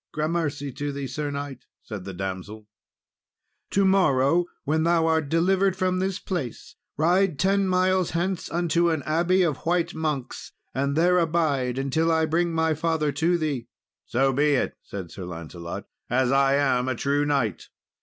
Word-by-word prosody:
"Grammercy 155 -3 -2
to 145 +3 -4
thee, 140 0 -4
Sir 145 +2 -3
knight," 140 -2 -6 0.2
said 100 -5 -7
the 95 - -6
damsel. 95 +3 -6 1.0
"To 195 0 +2
morrow, 175 -4 +3 0.2
when 155 +2 +1
thou 165 0 +3
art 160 -3 +1
delivered 190 +3 +2
from 185 0 0
this 190 0 -1
place, 170 - -5 0.2
ride 175 +1 +2
ten 195 +4 +2
miles 185 -1 +2
hence 175 +2 -2
unto 170 +1 +1
an 160 -4 -1
abbey 175 +5 +2
of 155 -5 0
white 170 0 0
monks, 150 -5 -4 0.2
and 140 +1 -1
there 180 +3 +4
abide 155 -7 +1
until 150 +5 +1
I 160 0 +3
bring 170 +2 +1
my 160 -1 +1
father 160 -1 0
to 165 +5 +1
thee." 145 -7 -2 0.4
"So 135 +2 +2
be 145 +2 +3
it," - - -1
said 95 -4 -8
Sir 95 - -8
Lancelot, 85 0 -7 0.2
"as 125 +1 +2
I 135 0 +4
am 130 -3 +2
a 130 - 0
true 140 +4 +1
knight." 140 -8 -1
155 Hz, 165 wpm, -25 LUFS, 135-170 Hz, 1.0 s, there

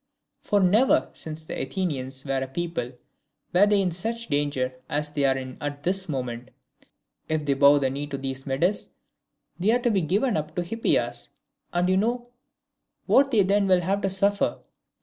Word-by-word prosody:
For 205 - +1
never, 210 +7 +3
since 155 0 -6
the - - -4
Athenians 135 -4 -3
were 135 -1 -1
a 135 - -2
people, 135 -4 -4 0.6
were 190 +3 +6
they 205 -1 +3
in 180 - 0
such 225 +6 -3
danger 145 -3 0 0.2
as 150 0 -1
they 145 -1 0
are 135 0 +3
in 130 -1 -7
at 145 0 -5
this 190 0 -1
moment. 125 -3 -4 0.8
If 155 -1 -1
they 140 - +2
bow 140 +1 +6
the 135 -2 +1
knee 145 +2 -4
to 140 -1 -4
these 135 0 -5
Medes, 170 +10 0 0.7
they 190 +4 +1
are 235 - +5
to 240 - +3
be 195 -3 +2
given 200 - +1
up 155 0 -4
to 175 - 0
Hippias, 225 +6 -1 0.4
and 175 0 +1
you 185 0 +3
know 240 +4 -1 0.7
what 275 +1 +4
they 220 -6 +4
then 200 +1 +2
will 185 -1 +4
have 195 +3 0
to 195 - 0
suffer. 200 +2 +1
170 Hz, 185 wpm, -25 LUFS, 140-200 Hz, 0.8 s, were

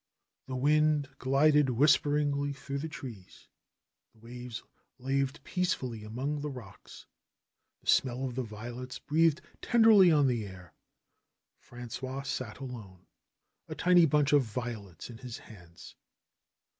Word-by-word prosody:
The 130 - -4
wind 150 +1 +2
glided 145 +2 +3
whisperingly 145 +2 +2
through 140 0 -5
the 160 +3 -4
trees; 115 -11 -10 0.7
the - - -27
waves 120 +1 -8 0.3
laved 135 +2 -2
peacefully 130 -12 -2
among 135 +7 -3
the 150 - -3
rocks; 125 -8 -11 0.8
the - - -29
smell 130 0 +2
of 130 - -4
the 130 - -2
violets 120 +3 -7
breathed 160 +3 +2 0.2
tenderly 220 -6 +6
on 150 -3 +4
the 120 -4 0
air. 90 -4 -13 0.9
Frangois 130 +3 -7
sat 125 -5 -4
alone, 110 -9 -9 0.6
a - - -6
tiny 175 -2 +5
bunch 150 -1 +2
of 145 - +6
violets 110 -5 -6
in 115 - -11
his 125 -2 -7
hands. 85 -6 -14
130 Hz, 125 wpm, -30 LUFS, 115-145 Hz, 0.9 s, tenderly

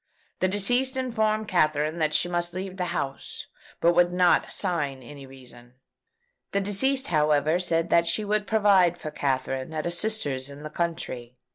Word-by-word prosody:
The 185 - +2
deceased 245 +7 +1
informed 220 -4 0
Katherine 155 -3 +1
that 155 -1 +1
she - - +2
must 175 0 -3
leave 190 0 -5
the 180 - -1
house, 140 -6 -5 0.3
but 170 +1 +4
would 175 0 +3
not 180 0 +3
assign 145 -8 -2
any 140 +1 -11
reason. 125 -2 -13 0.8
The 200 - +2
deceased, 265 +8 +1
however, 155 +1 +2
said 165 -2 0
that 170 0 +4
she 210 +5 +1
would 210 0 0
provide 195 -5 +4
for 155 - -7
Katherine 135 0 -2
at 155 - -3
a 175 - -1
sister's 160 -9 -1
in 140 +1 -11
the 155 - -7
country. 140 -8 -4
170 Hz, 165 wpm, -26 LUFS, 145-200 Hz, 0.8 s, but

